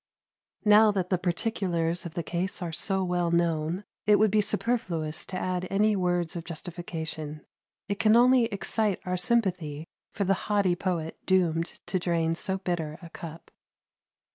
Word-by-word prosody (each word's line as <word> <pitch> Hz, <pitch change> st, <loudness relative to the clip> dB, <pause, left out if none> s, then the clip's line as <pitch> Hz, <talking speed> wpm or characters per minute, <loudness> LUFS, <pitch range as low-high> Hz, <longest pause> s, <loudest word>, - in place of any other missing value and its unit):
Now 210 Hz, +1 st, +7 dB
that 185 Hz, -2 st, -2 dB
the 185 Hz, -, +2 dB
particulars 175 Hz, -2 st, -1 dB
of 160 Hz, -, -12 dB
the 170 Hz, -, -2 dB
case 180 Hz, +3 st, -2 dB
are 170 Hz, -, -3 dB
so 190 Hz, +3 st, -1 dB
well 175 Hz, -1 st, 0 dB
known, 170 Hz, +1 st, 0 dB, 0.2 s
it 210 Hz, -, +7 dB
would 215 Hz, -1 st, +4 dB
be 215 Hz, 0 st, +4 dB
superfluous 180 Hz, -8 st, -1 dB
to 185 Hz, -, -4 dB
add 185 Hz, 0 st, -2 dB
any 210 Hz, +2 st, +3 dB
words 175 Hz, -3 st, 0 dB
of 170 Hz, -, -4 dB
justification; 160 Hz, -3 st, -6 dB, 0.4 s
it 200 Hz, -1 st, -3 dB
can 215 Hz, 0 st, +5 dB
only 250 Hz, 0 st, +6 dB
excite 210 Hz, -1 st, 0 dB
our 180 Hz, 0 st, -1 dB
sympathy 180 Hz, -9 st, 0 dB, 0.3 s
for 200 Hz, -, -2 dB
the 195 Hz, 0 st, +3 dB, 0.2 s
haughty 200 Hz, -4 st, +3 dB
poet 170 Hz, -3 st, -3 dB
doomed 170 Hz, -3 st, +1 dB
to 185 Hz, -, -1 dB
drain 165 Hz, -2 st, +1 dB
so 190 Hz, +3 st, -1 dB
bitter 170 Hz, -5 st, -3 dB
a 170 Hz, -, -10 dB
cup. 165 Hz, 0 st, -9 dB
180 Hz, 160 wpm, -28 LUFS, 165-200 Hz, 0.4 s, Now